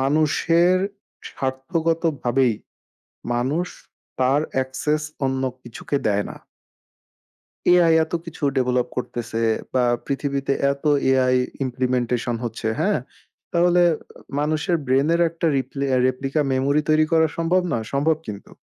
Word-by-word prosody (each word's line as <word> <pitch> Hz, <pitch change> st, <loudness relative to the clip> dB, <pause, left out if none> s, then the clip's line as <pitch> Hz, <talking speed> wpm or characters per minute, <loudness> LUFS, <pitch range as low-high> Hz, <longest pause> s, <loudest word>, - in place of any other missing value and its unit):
মানুষের 155 Hz, +5 st, +3 dB, 0.5 s
স্বার্থগতভাবেই 135 Hz, -3 st, 0 dB, 0.8 s
মানুষ 140 Hz, +9 st, 0 dB, 0.5 s
তার 130 Hz, +3 st, +3 dB
অ্যাক্সেস 130 Hz, +4 st, -1 dB, 0.2 s
অন্য 130 Hz, 0 st, -1 dB, 0.2 s
কিছুকে 120 Hz, +4 st, -3 dB
দেয় 105 Hz, -1 st, +1 dB
না। -, -, -8 dB, 1.4 s
AI 175 Hz, -2 st, +5 dB
এত 160 Hz, -, -17 dB
কিছু 165 Hz, -2 st, -11 dB
ডেভেলপ 125 Hz, -1 st, +1 dB
করতেছে 120 Hz, -2 st, -4 dB, 0.4 s
বা 125 Hz, -, +3 dB, 0.2 s
পৃথিবীতে 140 Hz, 0 st, -1 dB, 0.2 s
এত 140 Hz, +2 st, -10 dB, 0.3 s
AI 130 Hz, -1 st, +3 dB, 0.3 s
ইমপ্লিমেন্টেশন 125 Hz, -1 st, -1 dB
হচ্ছে, 115 Hz, -1 st, -4 dB
হ্যাঁ? -, -, +2 dB, 0.5 s
তাহলে 175 Hz, +1 st, +4 dB, 0.6 s
মানুষের 155 Hz, +4 st, +1 dB
ব্রেইনের 140 Hz, +6 st, +2 dB
একটা 165 Hz, +1 st, -3 dB
রিপ্লে 135 Hz, +1 st, -3 dB, 0.2 s
রেপ্লিকা 135 Hz, +3 st, -1 dB
মেমোরি 140 Hz, +3 st, +2 dB
তৈরি 155 Hz, 0 st, +4 dB
করা 160 Hz, 0 st, +5 dB
সম্ভব 170 Hz, +2 st, +2 dB
নয়? 115 Hz, -2 st, -1 dB
সম্ভব 150 Hz, +3 st, +2 dB
কিন্তু। 100 Hz, -1 st, -8 dB
140 Hz, 110 wpm, -22 LUFS, 130-160 Hz, 1.4 s, AI